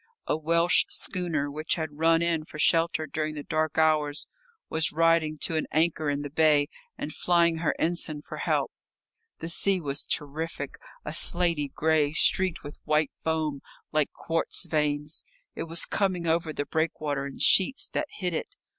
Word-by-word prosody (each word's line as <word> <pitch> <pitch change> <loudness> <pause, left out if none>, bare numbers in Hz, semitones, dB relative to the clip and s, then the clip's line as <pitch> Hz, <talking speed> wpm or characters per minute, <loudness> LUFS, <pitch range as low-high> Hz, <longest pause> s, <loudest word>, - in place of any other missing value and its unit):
A - - 0
Welsh 165 +2 +3
schooner, 165 -6 -2
which 155 +2 -1
had 155 -3 -5
run 165 +1 +4
in 165 -2 0
for 155 - -11
shelter 165 0 +2
during 155 +1 -3
the 145 - -6
dark 155 -1 -1
hours, 155 -2 +2 0.4
was 160 0 0
riding 165 -1 +2
to 165 - -1
an 155 - -1
anchor 155 -1 +1
in 145 0 -1
the 145 - -6
bay 150 -1 +3 0.3
and 155 - -5
flying 170 -2 +2
her 160 - 0
ensign 160 -3 -1
for - - -8
help. - - 0 0.7
The 165 - -6
sea 190 +3 +1
was 145 -3 -3
terrific 145 0 -3 0.3
a 150 - -4
slaty 170 -3 +4
grey, 155 -2 +1
streaked 185 +2 +2
with 145 0 -9
white 155 -2 +1
foam, 155 -3 -1 0.3
like 150 -2 +1
quartz 165 0 -2
veins. 150 -1 -1 0.3
It - - -4
was 165 0 -1
coming 185 -4 0
over 165 0 +1
the 145 -1 -3
breakwater 150 -3 -2
in 140 - -9
sheets 230 +8 +4
that 305 - -2
hid 180 -3 -3
it. 160 - -4
160 Hz, 165 wpm, -27 LUFS, 150-165 Hz, 0.7 s, run